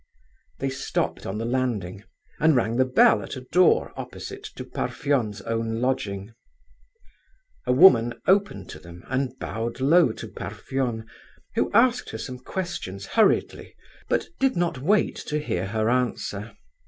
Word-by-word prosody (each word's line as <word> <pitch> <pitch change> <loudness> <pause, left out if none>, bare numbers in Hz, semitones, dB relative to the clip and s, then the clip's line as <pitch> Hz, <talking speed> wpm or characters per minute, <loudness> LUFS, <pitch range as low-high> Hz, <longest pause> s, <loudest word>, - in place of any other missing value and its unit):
They 135 0 -2
stopped 130 +1 -2
on 95 - -3
the 115 - -3
landing, 115 -7 -2 0.4
and 160 -1 +4
rang 115 -1 +1
the 130 - +4
bell 120 -4 +5
at 95 - -6
a 130 - -6
door 180 +8 +3
opposite 400 0 -7
to - - -7
Parfen's 130 -9 -1
own 115 0 -2
lodging. 100 -6 -1
An - - -26 1.3
old 125 0 +3
woman 120 -10 +7
opened 200 +2 +2
to - - -9
them 85 +1 -13
and 130 0 -1
bowed 115 0 -4
low 150 +1 +5
to - - -8
Parfen, 120 -4 -4 0.5
who - - 0
asked 245 +3 +3
her - - -5
some 125 -2 -6
questions 125 - -5
hurriedly, 220 -2 +2 0.3
but - - +1
did 270 -1 +2
not 170 -6 0
wait 200 +10 +2
to 150 - -1
hear 95 -11 -2
her 110 +1 -1
answer. 115 -3 -1
125 Hz, 150 wpm, -25 LUFS, 110-150 Hz, 1.3 s, woman